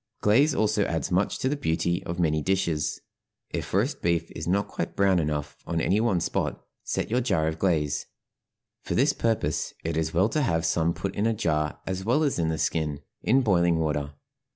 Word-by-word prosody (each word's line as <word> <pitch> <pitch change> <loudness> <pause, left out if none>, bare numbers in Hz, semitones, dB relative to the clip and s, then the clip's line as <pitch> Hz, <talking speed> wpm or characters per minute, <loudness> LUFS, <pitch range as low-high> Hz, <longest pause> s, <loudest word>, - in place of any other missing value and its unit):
Glaze 135 +9 +4
also 105 -1 +2
adds 80 +1 -2
much 95 +3 +1
to - - -1
the 140 - +1
beauty 85 - 0
of 85 +1 -4
many 80 -2 +2
dishes. 85 -3 0 0.5
If - - -4
roast - - 0
beef 85 -1 0
is 80 - -6
not 100 +3 +1
quite - - -4
brown 95 -2 +3
enough 75 -2 -2
on 85 -1 -1
any 100 +6 +2
one 110 -6 +2
spot - - -1 0.2
set - - -2
your 125 +2 +2
jar 80 -11 +1
of 80 0 -3
glaze 75 -6 0 0.7
for - - -3
this 140 +3 +3
purpose 110 -10 -1
it 80 -1 -2
is 80 0 0
well 95 +6 +3
to 155 - 0
have 85 - +1
some 80 0 +1
put 95 -1 -3
in 105 +3 0
a 115 - +1
jar 75 -6 -1
as 95 0 -3
well 125 +9 +2
as 140 - 0
in 80 -1 +1
the 80 - -1
skin 75 -1 -1 0.2
in 130 +4 +3
boiling 85 -6 +3
water. 75 -2 -1
85 Hz, 200 wpm, -26 LUFS, 80-105 Hz, 0.7 s, Glaze